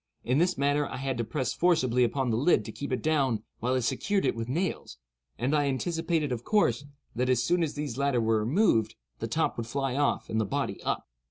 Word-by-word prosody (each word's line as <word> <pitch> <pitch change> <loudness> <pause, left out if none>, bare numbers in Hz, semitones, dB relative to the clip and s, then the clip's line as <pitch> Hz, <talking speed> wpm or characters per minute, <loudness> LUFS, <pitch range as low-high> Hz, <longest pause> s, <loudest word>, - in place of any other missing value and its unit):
In 130 +4 +1
this 175 +2 +2
manner 145 +1 +1
I - - -6
had 135 -2 -3
to - - +1
press 125 +4 -2
forcibly 130 -9 +2
upon 125 +1 0
the - - +1
lid 145 +10 +3
to - - -6
keep 140 - -6
it 130 - -1
down 135 -8 +1 0.2
while 125 +3 0
I 130 - +1
secured 195 - 0
it - - +1
with 115 +1 -4
nails; 165 - -2 0.4
and 130 +6 0
I 145 -1 +2
anticipated, 160 +1 -1
of 120 -1 -3
course, 140 - +2 0.3
that 125 +2 0
as 125 -2 +3
soon 175 0 +2
as 160 -3 -1
these 145 -4 -4
latter 140 -3 +2
were 110 -1 +2
removed, 115 - +2 0.2
the - - -3
top - - 0
would 115 -1 -4
fly 135 +1 -2
off 145 0 +1
and 110 0 0
the - - +2
body 95 - -2
up. - - -2
135 Hz, 230 wpm, -28 LUFS, 120-150 Hz, 0.4 s, lid